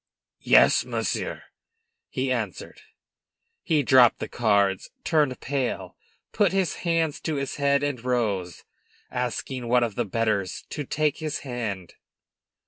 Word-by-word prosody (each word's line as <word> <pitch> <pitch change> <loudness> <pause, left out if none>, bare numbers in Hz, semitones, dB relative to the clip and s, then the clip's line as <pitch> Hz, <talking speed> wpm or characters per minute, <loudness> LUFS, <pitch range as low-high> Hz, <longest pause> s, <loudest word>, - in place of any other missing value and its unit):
"Yes, - - +5
monsieur," - - -3 0.7
he 130 0 -2
answered. 110 -7 -4 0.8
He 155 -3 +1
dropped 125 -2 +6
the - - -5
cards, 100 -4 +1
turned 145 -6 +1
pale, 125 -9 -3 0.4
put 200 -4 +2
his 190 -3 0
hands 165 -3 0
to 160 - -3
his 140 -1 -3
head 140 0 +2
and 140 -5 -2
rose, 105 -9 -1 0.5
asking 125 0 -3
one 125 +1 +4
of 115 -3 -1
the 120 +1 -1
bettors 105 -3 -1
to 145 - -4
take 150 +2 0
his 155 -1 -4
hand. 110 -8 -4
125 Hz, 130 wpm, -25 LUFS, 110-145 Hz, 0.8 s, dropped